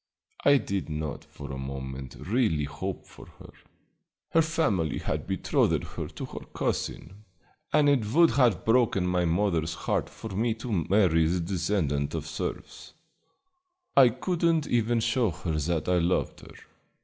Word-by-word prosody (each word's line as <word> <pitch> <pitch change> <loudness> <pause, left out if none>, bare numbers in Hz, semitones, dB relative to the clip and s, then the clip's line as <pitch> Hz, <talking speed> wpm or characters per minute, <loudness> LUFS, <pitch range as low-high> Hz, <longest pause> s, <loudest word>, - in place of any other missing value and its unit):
I 140 0 +6
did 100 -9 -3
not 75 -1 -4
for 70 -1 -9
a 65 - -5
moment 65 -1 -6
really 105 - 0
hope 75 +7 -5
for - - -14
her. - - -14 0.8
Her 165 - +5
family 110 - 0
had - - -3
betrothed - - +1
her - - -6
to - - -7
her - - -8 0.2
cousin, 95 +6 -3 0.5
and 150 -1 +4
it 135 -7 +3
would 165 +4 +5
have 120 - +2
broken 115 -5 +3
my 90 -1 +1
mother's 85 -2 0
heart - - -1
for 110 - -9
me 110 +4 0
to 115 +1 -6 0.2
marry 90 -5 +4
the 90 +2 0
descendant 85 -5 -1
of 80 -2 -3
serfs. 80 0 -6 1.0
I 130 -3 +8
could 165 +9 -3
n't 165 -3 +3
even 120 0 +1
show 115 -1 +2
her 80 -1 -3
that 80 0 -1
I 90 -1 +3
loved 85 +2 0
her. - - -13
95 Hz, 155 wpm, -27 LUFS, 80-120 Hz, 1.0 s, I